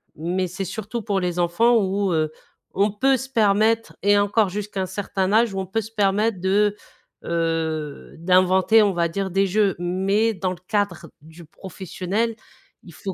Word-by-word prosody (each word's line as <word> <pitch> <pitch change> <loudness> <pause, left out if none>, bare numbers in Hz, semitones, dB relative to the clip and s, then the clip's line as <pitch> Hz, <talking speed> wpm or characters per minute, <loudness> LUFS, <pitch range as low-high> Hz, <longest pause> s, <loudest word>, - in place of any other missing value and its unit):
Mais 180 +4 -2
c'est 185 +2 -5
surtout 220 +5 -5
pour 200 -3 0
les 180 -1 -2
enfants 200 +8 +3
où, 195 -1 0
heu, 155 -1 0 0.4
on 200 +2 +2
peut 265 +6 +2
se 265 +2 -7
permettre 220 -1 +2
et 205 0 +4
encore 205 0 +2
jusqu'à 205 0 -4
un - - -1
certain 190 0 -2
âge, 225 -2 +3
où 195 - -3
on 190 - -3
peut 225 +5 -1
se 220 - -10
permettre 210 -1 +1
de, 205 +2 +2 0.5
heu, 160 -3 -3
d'inventer, 185 +5 +4
on 200 -2 +1
va 170 -1 +1
dire, 195 +2 -3
des 195 +2 +2
jeux. 200 0 +1
Mais 195 +5 +1
dans 185 -1 -2
le 185 - -6
cadre 205 -5 -2
du 160 +2 -14
professionnel, 190 +6 -4 0.5
il 170 - -14
faut 190 +3 -6
195 Hz, 180 wpm, -22 LUFS, 180-210 Hz, 0.5 s, et